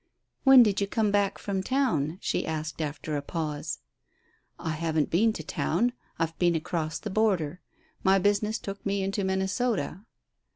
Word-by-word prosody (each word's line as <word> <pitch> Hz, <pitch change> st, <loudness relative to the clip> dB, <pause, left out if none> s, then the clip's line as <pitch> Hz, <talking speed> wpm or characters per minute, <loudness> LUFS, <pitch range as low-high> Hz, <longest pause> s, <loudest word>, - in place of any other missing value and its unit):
"When 270 Hz, -2 st, +9 dB
did 205 Hz, -3 st, +1 dB
you 200 Hz, -, +1 dB
come 215 Hz, 0 st, +1 dB
back 200 Hz, -1 st, +2 dB
from 195 Hz, -2 st, -2 dB
town?" 180 Hz, -, 0 dB
she -, -, -1 dB
asked, 160 Hz, 0 st, -3 dB
after 150 Hz, 0 st, -3 dB
a 145 Hz, -, -1 dB
pause. 150 Hz, -, -4 dB, 0.8 s
"I 160 Hz, -, -3 dB
haven't 155 Hz, -1 st, 0 dB
been 220 Hz, +7 st, +4 dB
to 160 Hz, -, -6 dB
town. 220 Hz, +10 st, 0 dB, 0.2 s
I've 165 Hz, -1 st, -1 dB
been 175 Hz, -1 st, +3 dB
across 160 Hz, -1 st, -2 dB
the 215 Hz, -, -6 dB
border. 185 Hz, -6 st, +1 dB, 0.4 s
My 190 Hz, 0 st, +5 dB
business 205 Hz, +3 st, +1 dB
took 200 Hz, -3 st, -7 dB
me 200 Hz, -1 st, 0 dB
into 195 Hz, +1 st, -1 dB
Minnesota." 190 Hz, +1 st, -1 dB
190 Hz, 160 wpm, -28 LUFS, 160-205 Hz, 0.8 s, When